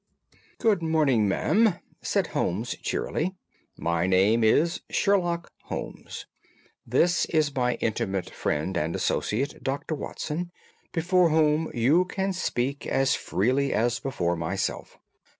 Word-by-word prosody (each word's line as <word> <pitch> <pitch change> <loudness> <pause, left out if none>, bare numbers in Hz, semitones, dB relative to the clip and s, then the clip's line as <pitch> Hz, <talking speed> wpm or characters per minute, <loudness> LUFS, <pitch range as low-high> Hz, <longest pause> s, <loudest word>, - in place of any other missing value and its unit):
"Good 210 -6 +2
morning, 150 -9 +2
madam," 195 - +3 0.3
said - - +1
Holmes 110 +7 -1
cheerily. 185 +4 -2 0.4
"My 85 +1 0
name 100 +5 +4
is 160 +10 +3
Sherlock 175 -4 +1
Holmes. - - -6 0.6
This 170 +9 +3
is 155 -3 +1
my 125 -2 +1
intimate 100 -5 -2
friend 80 +6 -2
and 85 -1 -1
associate, 135 +7 -1
Dr. 140 +4 -2
Watson, 160 +3 -4 0.4
before 175 +1 +3
whom 155 0 +2
you 140 +10 +4
can 190 +1 -2
speak 140 -6 -2
as 135 0 +2
freely 130 +8 0
as 120 +2 +1
before 90 -10 -1
myself. 85 +4 -3
135 Hz, 115 wpm, -26 LUFS, 110-170 Hz, 0.6 s, name